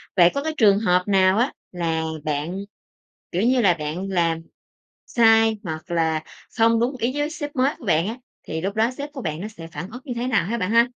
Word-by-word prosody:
Vậy 175 -2 +7
có 280 - -2
trường 205 -5 +5
hợp 180 -4 +2
nào 190 0 +4
á 245 +4 +2 0.2
là 165 -2 -1 0.2
bạn, 155 +4 -2 0.7
kiểu 175 - 0
như 250 +2 +3
là, 185 -5 +5
bạn 165 +5 -4
làm 170 -3 +1 0.7
sai, 225 -1 +4
hoặc 160 +1 -6
là 160 -2 +1 0.4
không 230 0 +4
đúng 250 +3 0
ý 235 +3 0
với 295 +1 0
sếp 290 -3 -6
mới 265 +3 +2
của - - -13
bạn 170 -2 +2
á, 225 - -4 0.3
thì 160 0 -3
lúc 195 +3 -2
đó 225 +2 +2
sếp 290 +1 -5
của 275 - -7
bạn 155 0 -3
nó 210 - -4
sẽ 170 -7 -10
phản 175 +3 -7
ứng 250 +2 -8
như 260 - -5
thế 240 +1 -2
nào 235 -8 +2
ha 230 +6 -2
bạn 185 -2 -1
ha? 230 +1 +6
200 Hz, 225 wpm, -23 LUFS, 170-235 Hz, 0.7 s, Vậy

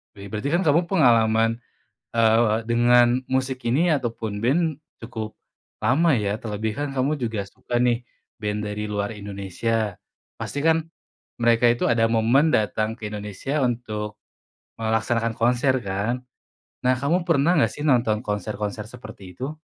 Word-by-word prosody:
Be 100 0 -10
berarti 110 +6 -2
kan 175 - +3
kamu 165 +2 +3
pengalaman, 115 - +3 0.5
eee, 115 -1 +4
dengan 120 +1 +4
musik 130 0 -1
ini 150 +9 +2
ataupun 115 -6 -3
ben 155 +4 +2 0.2
cukup 110 -2 -6 0.5
lama, 140 +9 +3
ya. 105 -4 0
Terlebihkan 110 +5 -3
kamu 135 +3 0
juga 115 -5 -2
suka 120 +4 -3
nih 120 0 +1 0.4
ben 105 0 -2
dari 105 0 -4
luar 105 -1 -2
Indonesia, 105 +1 -3 0.4
pasti 145 - -4
kan 160 0 +3 0.6
mereka 115 0 +4
itu 120 - +1
ada 115 -1 +3
momen 120 +7 +3
datang 110 0 +1
ke 110 -3 -5
Indonesia 105 +8 -3
untuk 110 -3 -3 0.6
melaksanakan 115 +1 0
konser 125 +3 +2
kan? 100 +6 -2 0.6
Nah, 130 0 +4
kamu 165 +6 +1
pernah 165 +2 +3
nggak 145 - +3
sih 145 - -6
nonton 115 -5 +2
konser-konser 105 0 -3
seperti 110 -6 -11
itu? 145 - -5
115 Hz, 135 wpm, -24 LUFS, 105-130 Hz, 0.6 s, eee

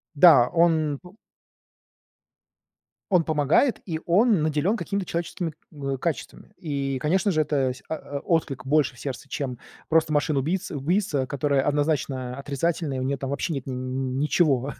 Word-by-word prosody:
Да, 145 -6 +7
он 160 -4 +2
пу 185 +3 -16 2.0
он 175 -3 +4
помогает, 155 - +2
и 160 -3 -3
он 200 +1 +4
наделён 155 +8 +1
какими-то 200 -3 -3
человеческими, 170 -1 -3 0.2
ы, 140 -2 -3
качествами. 165 +2 -4
И, 140 -4 -2
конечно 185 +8 +1
же, 155 -3 +1
это 140 -4 +1
се 125 - -13
о 145 -2 -4
о - - -10 0.2
отклик 135 -4 -5
больше 145 -2 +2
в - - -14
сердце, 140 0 -6
чем 130 -4 -4 0.3
просто 160 -1 +3
машины 145 -1 +1
убийц 180 +7 -2
убийца, 145 -2 0
которая 140 0 +1
однозначно 140 -4 0
отрицательный, 145 +1 -2
у - - -2
неё 135 +2 0
там 135 0 -5
вообще 140 +4 -2
нет 135 - -5
н 130 - -4
н 130 +1 -3
ничего, 145 -3 +2
145 Hz, 160 wpm, -25 LUFS, 135-165 Hz, 2.0 s, Да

